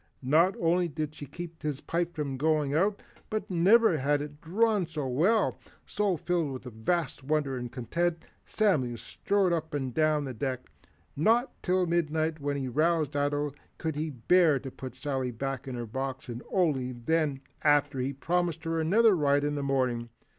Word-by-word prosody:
Not 165 +8 +4
only 175 +1 +2
did 155 -1 -4
she 145 - -9
keep 170 +2 -8
his 150 -2 -2
pipe 170 +2 -2
from 145 -3 -2
going 150 0 +1
out, 195 +6 +1 0.3
but 215 -2 -3
never 190 +2 +5
had 145 +2 +2
it 145 +1 -7
drawn 205 +2 +1
so 155 -4 -4
well. 185 - +2 0.3
So, 205 -4 0
filled 170 -2 -1
with 130 0 -7
a 125 - -7
vast 145 +8 -1
wonder 145 -1 0
and 120 -1 -5
content, 170 +7 -1 0.3
Samuel 145 - +1
strode 195 - 0
up 160 -2 -2
and 130 -3 -2
down 155 0 +2
the 130 - -5
deck. 130 +1 -4 0.4
Not 230 - +3
till 185 0 +2
midnight 160 -2 0
when 145 0 -2
he 135 -2 -3
roused 155 +2 +1
Ato 145 0 0 0.2
could 160 -2 -3
he 155 +2 -2
bear 155 +4 +3
to 135 - -7
put 130 0 -8
Sally 135 -3 -2
back 135 +2 -4
in 130 - -4
her 120 -1 -4
box 130 +3 -5
and 120 +1 -5
only 140 -9 +1
then, 145 +3 0 0.2
after 145 -2 +3
he 125 - 0
had 140 0 -7
promised 175 -2 0
her 165 0 -1
another 210 +6 +5
ride 145 -3 +2
in 145 0 0
the 145 - -2
morning. 130 -4 0
150 Hz, 180 wpm, -29 LUFS, 135-170 Hz, 0.4 s, never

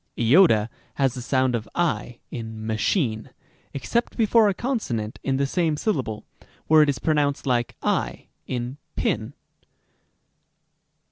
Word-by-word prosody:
Rem.g. 150 +11 +6 0.4
«has 135 -3 +2
the 125 - -6
sound 130 0 +1
of 110 -2 -3
ὁ 155 -8 -1
in 110 -2 -6
machine, 110 - 0 0.4
except 235 - -2
before 225 -1 +4
a - - +1
conso 240 - -2
nant 110 -1 -4
in 135 -1 0
the 140 - +1
same 160 0 0
syllable, 130 - -2 0.4
where 155 0 +6
it 150 - +4
is 140 - 0
pronounced 145 -3 0
like 120 -3 0
¢ - - -1 0.2
in 125 +2 -4 0.2
pin. - - -1
135 Hz, 135 wpm, -24 LUFS, 120-165 Hz, 0.4 s, Rem.g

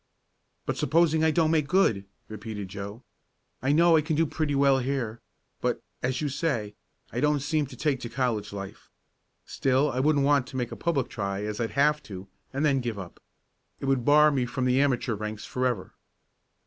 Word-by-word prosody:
"But - - -2
supposing 160 +2 +3
I 160 - +5
don't 160 0 +2
make 155 -3 +2
good?" 135 - +2 0.2
repeated 105 -2 -6
Joe. 100 +4 -7 0.6
"I 130 +2 +1
know 165 +2 +5
I 155 - +5
can 155 +1 -1
do 165 +2 +3
pretty 155 -1 -1
well 140 -1 +4
here, 125 -4 -2 0.4
but, - - 0 0.2
as 130 +2 -1
you 150 - 0
say, 130 -8 -2 0.4
I - - -3
don't 150 0 +2
seem 150 +1 0
to - - -11
take 145 -4 0
to 120 - -6
the 120 - -17
college 120 -6 -1
life. 100 -1 -8 0.6
Still, 135 +3 +1
I 125 - -2
wouldn't 145 0 +3
want 140 -3 +3
to 130 - -7
make 120 -2 -2
a - - -5
public 155 -7 0
try 100 -2 -3
as 105 +1 -4
I'd 115 +2 -3
have 150 +1 +4
to, 95 -1 -8 0.2
and 140 +3 0
then 135 -3 +2
give 120 -3 -3
up. 95 -3 -9 0.6
It - - -5
would 135 -2 +1
bar 150 +3 +6
me 130 -3 0
from 125 +1 -2
the 130 +2 +3
amateur 125 -4 +1
ranks 105 0 -5
forever." 125 -6 -2
130 Hz, 200 wpm, -27 LUFS, 110-150 Hz, 0.6 s, bar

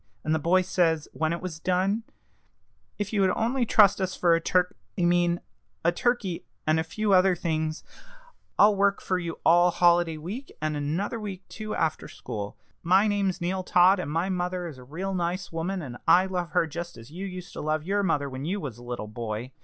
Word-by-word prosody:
And 155 - 0
the 160 - +1
boy 185 +4 +3
says, 165 -4 +1
when 160 0 0
it 170 - -3
was 170 -4 -5
done, 185 +5 +1 1.0
'If 205 +1 -3
you 205 - +2
would 190 - +4
only 240 +2 0
trust 205 -2 +5
us 185 0 -1
for 170 -2 +3
a 165 - +2
turk 180 +1 +1 0.2
I - - +2
mean, 175 0 +2 0.4
a 170 - +5
turkey, 200 -3 -1 0.2
and 155 +1 +3
a - - +1
few 205 +5 -1
other 185 0 +5
things, 160 -2 -2 0.7
I'll 205 0 +6
work 200 0 +2
for 185 -1 -1
you 170 -2 -5
all 175 +1 +6
holiday 175 -2 +3
week, 205 - -7
and 155 0 -1
another 160 +10 -2
week 195 -3 -7
too, 215 -1 -5
after 160 -2 -1
school. 105 -1 -6 0.2
My 190 +4 +4
name's 200 -3 0
Neal 185 +2 -1
Todd, 185 +2 +5
and 160 - -3
my 165 +4 0
mother 180 -1 -2
is 145 -6 -9
a - - -11
real 180 +9 -4
nice 180 +1 -2
woman, 170 +3 -3
and 125 -4 -7
I 185 +2 +6
love 180 -2 -3
her - - +3
just 170 +2 -6
as 115 +4 -13
you 190 +4 -5
used 180 0 -8
to - - -6
love 155 0 -1
your 200 +4 0
mother 150 -7 +1
when 130 0 -6
you 190 +7 -2
was 130 - -6
a - - -12
little 120 -3 -5
boy.' 110 +2 -5
175 Hz, 210 wpm, -27 LUFS, 160-190 Hz, 1.0 s, I'll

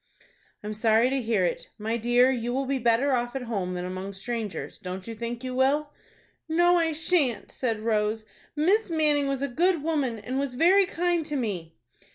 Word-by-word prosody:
"I'm 210 +1 -4
sorry 225 +3 +3
to 270 -1 0
hear 220 -5 +1
it. 175 - -3
My 220 +1 -2
dear, 240 +2 +4
you 245 -1 -2
will 270 +1 0
be 270 0 -1
better 240 +4 +2
off 240 0 -1
at 265 - -3
home 195 -6 -3
than 180 0 -3
among 185 +2 -5
strangers. 210 -2 -5
Don't 185 0 -6
you 230 - -6
think 235 +2 -5
you 255 0 -4
will?" 285 +3 +1 0.6
"No, 350 +2 +4
I 330 -1 +2
shan't," 310 -6 0
said 225 -4 -2
Rose. 215 0 0 0.3
"Miss 380 +8 +2
Manning 300 -3 +2
was 275 0 -1
a - - +1
good 330 +4 +1
woman, 290 -8 0
and 255 +5 -3
was 275 -3 -2
very 365 +7 +5
kind 350 -1 0
to 295 - -2
me." 195 -11 -3
250 Hz, 195 wpm, -26 LUFS, 220-295 Hz, 0.6 s, very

